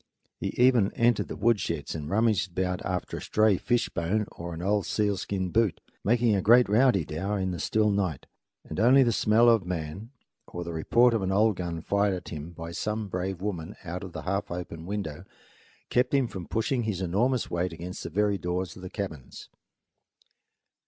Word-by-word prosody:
He - - -2
even 125 -5 +4
entered 120 -1 +2
the - - -6
woodsheds 100 -10 0
and 75 -2 -5
rummaged 105 -2 +1
about 90 -1 0
after 90 -2 -3
a - - -7
stray 110 -3 +3
fishbone 110 -4 0
or 85 0 -7
an 80 - -6
old 100 +1 +1
sealskin 100 -2 -1
boot, 110 -4 +2 0.2
making 115 0 +3
a 95 - +1
great 120 +5 +6
rowdydow 100 - +2
in 95 -1 -1
the 90 - -4
still 105 +6 +2
night; 95 -8 -1 0.4
and - - -5
only 130 +5 +6
the 120 - +2
smell 110 +2 +4
of 115 -4 +5
man, 90 +4 -5 0.4
or 90 - -6
the 85 0 -6
report 115 +9 +3
of 115 - +1
an 95 0 -1
old 105 +2 +3
gun 85 -2 -4
fired 100 +2 +1
at 90 - -8
him 75 +1 -6
by 85 -1 -8
some 105 +3 -3
brave 90 0 -3
woman 95 -3 -4
out 90 +1 -5
of 95 -3 -8
the - - -6
half 100 +2 -2
open 85 -1 -6
window, 100 -7 -4 0.7
kept 125 +2 +2
him 135 -3 +3
from 95 -6 -7
pushing 115 +3 0
his 110 -5 -2
enormous 110 +8 0
weight 85 +1 -1
against 85 +2 -7
the - - -5
very 100 +3 +1
doors 90 0 -3
of - - -11
the 90 - -7
cabins. 85 - -7
95 Hz, 185 wpm, -27 LUFS, 85-110 Hz, 0.7 s, great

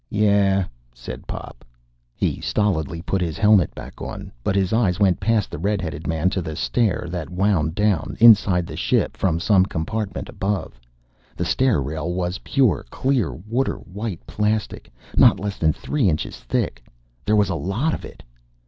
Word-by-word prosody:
"Yeah," 100 -2 +3 0.3
said - - -9
Pop. - - -8 0.5
He - - -1
stolidly 85 -5 -1
put 95 +1 -1
his 80 -3 -2
helmet 105 -5 +4
back - - -10
on. - - -6
But 95 - 0
his 95 0 +1
eyes 100 -5 +2
went 95 -4 +3
past 110 0 +1
the - - -5
red 100 +3 0
headed 80 -5 -5
man 80 +3 +1
to 95 - -1
the 80 -2 -5
stair 110 +2 0
that 90 -3 -4
wound 90 -4 +1
down, 105 -6 0
inside 105 -6 +6
the - - -8
ship, - - 0
from 85 -4 0
some 95 0 +4
compartment 100 +4 -3
above. 95 -2 -3 0.6
The 90 - -2
stair 105 - +2
rail 80 +5 -3
was 90 +1 -2
pure, 130 -9 +1
clear, 130 - 0
water 115 +9 -2
white 100 -1 -6
plastic, 105 0 -2 0.3
not - - +6
less 100 0 -4
than 80 -1 +3
three 130 - 0
inches 75 -2 -3
thick. - - -2 0.4
There 105 - +2
was 105 -3 +3
a - - 0
lot 110 - -1
of - - -5
it! - - -11
95 Hz, 170 wpm, -22 LUFS, 85-105 Hz, 0.6 s, inside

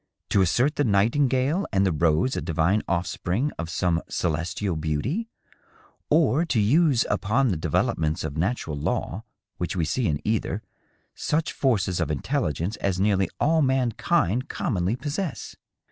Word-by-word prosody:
— - - -57
^to 100 - +4
assert 125 - +2
the 145 - +3
nightingale 130 - +2
and 100 0 +2
the 95 - +2
rose 80 - +2
a - - -2
divine 85 +6 +1
ofispring 95 +8 -1
of 85 -1 -3
some 85 -1 0
celestial 85 +3 -1
beauty, 80 - -2 0.8
or 155 0 +3
to 145 -9 0
use 135 +3 +3
upon 120 +6 +1
the 95 - 0
developments 80 0 0
of 75 -2 -4
natural 85 -2 -1
law 85 +7 -2 0.3
which 90 +2 -3
we 85 -3 0
see 115 +9 0
in 75 -2 0
either, 110 -1 -1 0.5
such 160 +1 -1
forces 100 -9 +1
of 85 - 0
intelligence 85 - -1
as 95 -2 -1
nearly 95 -1 +2
all 160 +1 +3
mankind 130 - +1
com - - -2
monly 95 +5 0
possess 155 +2 -4
100 Hz, 150 wpm, -25 LUFS, 85-135 Hz, 0.8 s, ^to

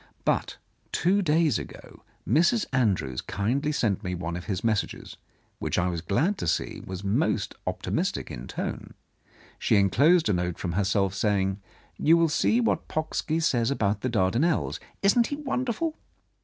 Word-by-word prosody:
But - - 0 0.3
two 195 +4 +2
days 155 - +2
ago - - -11 0.3
Mrs. 170 - +3
Andrews 95 - +1
kindly 130 +9 -1
sent 110 -10 0
me 90 0 -2
one 85 -1 -4
of 90 - -6
his 95 -2 -3
messages, 110 -3 -1 0.4
which - - -2
I 90 0 +2
was 85 -2 -3
glad 150 - 0
to - - -2
see 80 - -1
was 95 +1 -7
most 105 -1 0
optimistic - - -2
in - - -7
tone. - - -5 0.6
She - - +3
en 100 -1 +3
closed 165 +3 +4
a 105 - +2
note 90 -1 -1
from 90 - -3
herself, 95 +1 +1
saying: 95 -1 0 0.4
"You 165 +2 +5
will 170 - +3
like 165 - +2
to - - 0
see 230 - +3
what 235 - 0
Pocksky 155 0 -1
says 120 -8 +1
about 105 -6 0
the 130 - -1
Dardanels. 115 - +1 0.2
Isn't 230 +4 +4
he 285 - -3
wonderful?" 275 +2 -2
115 Hz, 170 wpm, -26 LUFS, -, 0.6 s, You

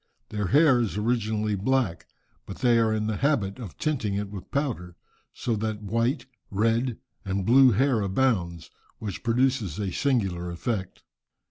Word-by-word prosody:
Their 105 -2 -2
hair 140 - +5
is 110 -4 -1
originally 110 -1 0
black, 100 -4 0 0.4
but 95 - -7
they 120 -2 +3
are 110 -1 +2
in 110 0 0
the 110 -1 -1
habit 120 -7 0
of 105 -9 -8
tinting 125 -10 -1
it 100 0 -3
with 100 -3 -8
powder, 115 - -2 0.4
so 115 - -2
that 110 0 -3
white, 115 +8 0 0.2
red, 115 +4 +1 0.3
and 95 -1 -2
blue 130 +4 +7
hair 125 +1 +2
abounds, 95 -6 0 0.3
which 105 -4 -5
produces 120 - +1
a 100 -3 -2
singular 95 -11 0
effect. 95 +2 -4
110 Hz, 150 wpm, -26 LUFS, 100-125 Hz, 0.4 s, blue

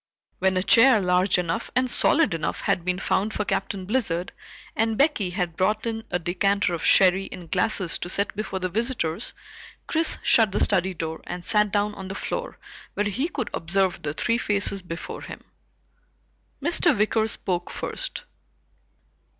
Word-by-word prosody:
When 190 0 +2
a 185 - +1
chair 230 +2 +6
large 180 0 +2
enough 170 -2 -2
and 255 0 +2
solid 270 - +3
enough 165 -1 -3
had 175 - 0
been 180 +1 -1
found 200 +3 -1
for 210 - -1
Captain 195 -1 -2
Blizzard, 190 -6 -1 0.4
and 225 0 0
Becky 275 - +2
had 180 -3 -3
brought 210 +5 0
in 225 -1 -3
a 180 - 0
decanter 190 +2 0
of 170 - -4
sherry 190 0 +4
and 175 -3 -10
glasses 190 -6 +1
to 175 - -5
set 200 +2 -1
before 210 -2 -4
the 185 0 -2
visitors, 220 -2 -2 0.5
Chris 320 0 +1
shut 220 -5 +4
the - - +1
study 185 +1 +1
door 160 -1 -5
and 175 0 -6
sat 210 -1 +2
down 205 +1 0
on 190 -2 -8
the 195 - -6
floor - - -4 0.4
where 205 - 0
he 255 - -1
could 255 -9 -4
observe 185 +2 0
the 145 -1 -3
three 230 +8 0
faces 200 -2 +1
before 170 -2 -7
him. - - -9 1.2
Mr. 335 -3 +2
Wicker 215 +1 +2
spoke 180 -4 -1
first. - - -4
195 Hz, 165 wpm, -24 LUFS, 180-220 Hz, 1.2 s, chair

